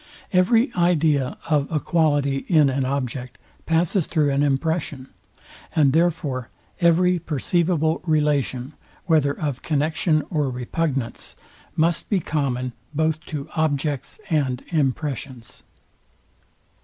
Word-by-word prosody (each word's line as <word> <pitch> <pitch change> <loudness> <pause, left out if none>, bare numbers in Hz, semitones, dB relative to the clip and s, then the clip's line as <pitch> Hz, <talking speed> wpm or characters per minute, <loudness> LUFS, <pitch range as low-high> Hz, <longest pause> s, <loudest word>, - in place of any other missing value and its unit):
Every 225 +8 +3
idea 160 -6 +2
of 150 -2 +1
a 155 - +1
quality 145 -3 +1
in 150 -5 +5
an 135 0 0
object 130 -2 -3 0.3
passes 165 +1 +1
through 150 -4 +1
an 140 +1 +1
impression; 145 -1 -1 0.7
and 145 -4 +4
therefore 155 -7 0 0.3
every 180 +1 +4
perceivable 160 +1 0
relation, 150 -3 0 0.3
whether 150 -5 +2
of 145 -5 -2
connexion 155 +1 +1
or 150 -5 +1
repugnance, 130 0 -3 0.4
must 165 +1 +1
be 200 - +2
common 130 -6 -2 0.2
both 160 0 0
to 145 -1 -5
objects 145 - -1
and 135 -6 0
impressions. 140 -5 -2
150 Hz, 105 wpm, -23 LUFS, 135-165 Hz, 0.7 s, in